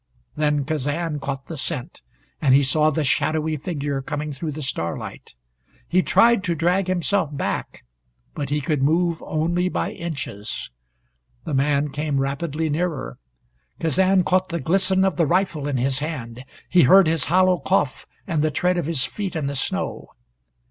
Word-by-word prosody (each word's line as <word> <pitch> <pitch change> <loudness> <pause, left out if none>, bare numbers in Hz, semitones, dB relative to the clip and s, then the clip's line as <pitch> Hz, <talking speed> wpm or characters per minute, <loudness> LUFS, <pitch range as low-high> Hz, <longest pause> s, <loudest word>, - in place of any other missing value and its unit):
Then 150 -2 +1
Kazan 150 +2 -2
caught 135 -1 -4
the 165 - -7
scent, 145 -3 -3 0.4
and 135 -3 +5
he 140 - +5
saw 150 +3 +4
the 155 +1 -1
shadowy 155 +3 +1
figure 145 -3 -3
coming 150 +2 -4
through 150 +2 -4
the 150 +1 -6
starlight. 85 - -5 0.5
He 185 +2 +3
tried 230 +1 +4
to 170 -3 0
drag 175 +4 +1
himself 185 -1 +1
back, - - -3 0.5
but 145 -3 -4
he 150 0 0
could 145 0 -1
move 165 +3 +2
only 175 +3 0
by - - -2
inches. 140 -11 -5 0.7
The - - -5
man 140 +2 +2
came 145 0 -1
rapidly 145 +3 -2
nearer. 155 - -2 0.6
Kazan 185 +3 +3
caught 185 +1 +1
the 170 -1 -2
glisten 190 +4 +2
of 185 -5 0
the 165 - +3
rifle 170 -4 0
in 140 -3 -1
his 130 +2 0
hand. 125 -5 -5 0.2
He 180 - +5
heard 190 +7 +7
his 160 -3 +2
hollow 185 +1 +3
cough, 135 -2 0 0.2
and 160 -3 0
the 155 - +2
tread 180 +3 +1
of 160 - -3
his 150 -5 0
feet 195 -4 -5
in 155 -3 -1
the 140 - -2
snow. 135 - -2
155 Hz, 165 wpm, -23 LUFS, 140-175 Hz, 0.7 s, heard